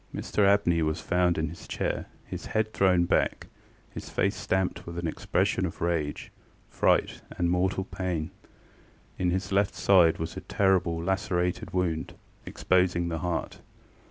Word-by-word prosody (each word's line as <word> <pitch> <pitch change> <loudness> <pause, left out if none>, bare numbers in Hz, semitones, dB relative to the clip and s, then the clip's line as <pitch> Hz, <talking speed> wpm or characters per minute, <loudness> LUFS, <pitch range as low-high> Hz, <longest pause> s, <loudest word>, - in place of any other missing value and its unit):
ŌĆØ - - -4
Mr 100 -2 +1
Abney 100 -5 +3
was 80 0 0
found 90 -1 +1
in 80 -1 -1
his 85 +2 -11
chair, - - -2 0.2
his - - -7
head 110 0 -1
thrown 90 -2 +3
back, - - +1 0.5
his - - -8
face 100 +1 0
stamped 95 -4 -1
with 85 0 -6
an 85 - -3
expression 80 - 0
of - - -4
rage, 80 -4 -2 0.4
fright, - - +1 0.2
and 85 0 +1
mortal 95 +1 +1
pain. 90 -5 -3 0.9
In 90 - +1
his 95 +1 -2
left 100 0 +2
side 90 -5 +5
was 80 - -5
a - - -5
terrible 95 -4 +1
lacerated 95 -1 -1
wound, 85 -3 -1 0.3
exposing 90 -2 +1
the 80 -1 -3
heart. 90 -1 -3
90 Hz, 155 wpm, -27 LUFS, 85-95 Hz, 0.9 s, side